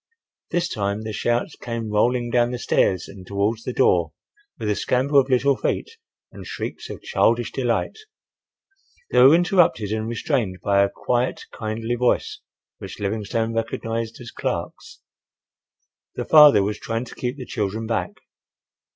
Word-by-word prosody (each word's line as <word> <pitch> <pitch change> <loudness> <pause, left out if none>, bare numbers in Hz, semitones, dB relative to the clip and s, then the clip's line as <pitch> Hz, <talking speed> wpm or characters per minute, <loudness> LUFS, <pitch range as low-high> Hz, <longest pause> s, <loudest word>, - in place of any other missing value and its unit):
This 175 0 0
time 100 -3 -2
the 110 -1 -5
shouts 120 +7 -1
came 115 -2 -5
rolling 120 +3 +1
down 120 0 +3
the 125 - -3
stairs 95 -5 +1
and 100 -1 -11
towards 100 +4 -1
the - - -3
door, 85 -9 +2 0.4
with 110 - -4
a 105 - +1
scamper 135 +6 +2
of 135 0 0
little 135 +2 +3
feet 450 - -2 0.4
and - - -10
shrieks - - -6
of - - -8
childish - - +1
delight. - - -1 1.1
They - - +3
were 135 +5 +8
interrupted 175 - +2
and 110 0 -2
restrained 115 - -1
by 100 -1 +3
a 100 - +3
quiet, 125 +4 -1
kindly 115 +2 -3
voice 120 0 0 0.4
which - - -9
Livingstone 110 +3 -2
recognized 115 0 -3
as 120 -2 -9
Clark's. - - -5 1.1
The - - -3
father 150 -10 +7
was 105 +1 -3
trying 115 +2 -3
to - - -11
keep 125 +2 -4
the 130 - -7
children 110 0 -3
back. 115 0 -2
115 Hz, 150 wpm, -23 LUFS, 105-125 Hz, 1.1 s, were